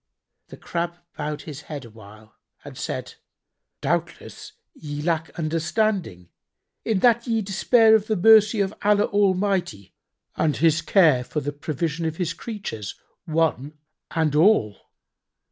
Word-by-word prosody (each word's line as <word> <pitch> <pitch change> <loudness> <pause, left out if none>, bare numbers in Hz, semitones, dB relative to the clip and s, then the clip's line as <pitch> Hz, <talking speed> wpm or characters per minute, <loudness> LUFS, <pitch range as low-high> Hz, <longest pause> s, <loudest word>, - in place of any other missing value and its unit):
The - - -12
Crab 170 0 -4 0.2
bowed 150 -1 -5
his 150 -2 -8
head 145 -5 -6
awhile 110 -1 -15 0.3
and - - -10
said, - - -5 0.7
"Doubtless - - -4 0.2
ye 145 -1 -7
lack 160 +1 -1
understanding, 165 - -1 0.5
in 215 -5 0
that 235 0 +3
ye 225 -2 0
despair 220 +3 +4
of 215 -1 +3
the 220 - 0
mercy 215 +2 +5
of 195 +1 -1
Allah 205 0 +3
Almighty 190 - 0 0.4
and 155 -2 0
His 165 0 +3
care 165 -8 +4
for 150 - -4
the 145 0 -4
provision 155 +3 -3
of 160 0 -5
His 170 -3 -2
creatures 170 - -6 0.3
one 155 -3 -1 0.3
and 160 -3 0
all. 150 - +2
165 Hz, 130 wpm, -23 LUFS, 150-205 Hz, 0.7 s, mercy